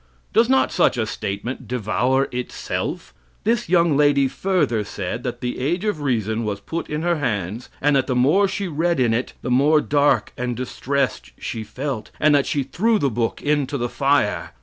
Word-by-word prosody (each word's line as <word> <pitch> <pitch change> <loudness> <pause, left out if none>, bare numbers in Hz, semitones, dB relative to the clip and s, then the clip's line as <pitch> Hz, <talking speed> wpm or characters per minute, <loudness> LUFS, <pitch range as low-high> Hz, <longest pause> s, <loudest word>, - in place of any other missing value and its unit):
Does 230 +2 +4
not 265 0 +3
such - - +2
a 115 - +1
statement 110 +4 -5
devour 125 +3 +1
itself? 125 - -4 0.3
This 225 -4 0
young 170 -4 +4
lady 145 -1 +4
further 145 - 0
said 100 +2 -4
that 120 -1 -5
the 125 0 -3
"Age 170 +10 -1
of 205 -8 -1
Reason" 115 -4 0
was 105 -2 -3
put 165 +11 -5
in 150 +1 -2
her 175 -1 +1
hands, 105 - -3
and 145 0 +3
that 135 - +2
the 130 - 0
more 150 +11 +4
she 195 0 -3
read 170 0 0
in 120 -3 +3
it, 120 +3 -2
the 125 - -2
more 145 +5 +5
dark 145 -6 +2
and 125 0 -3
distressed 135 +2 -2
she 110 - -5
felt, 120 +1 -5
and 155 0 +4
that 140 -1 +3
she 140 - 0
threw 215 - +1
the 140 -9 0
book 115 0 -2
into 145 -1 0
the 120 -1 -2
fire. 140 -6 +1
135 Hz, 190 wpm, -22 LUFS, 120-150 Hz, 0.3 s, more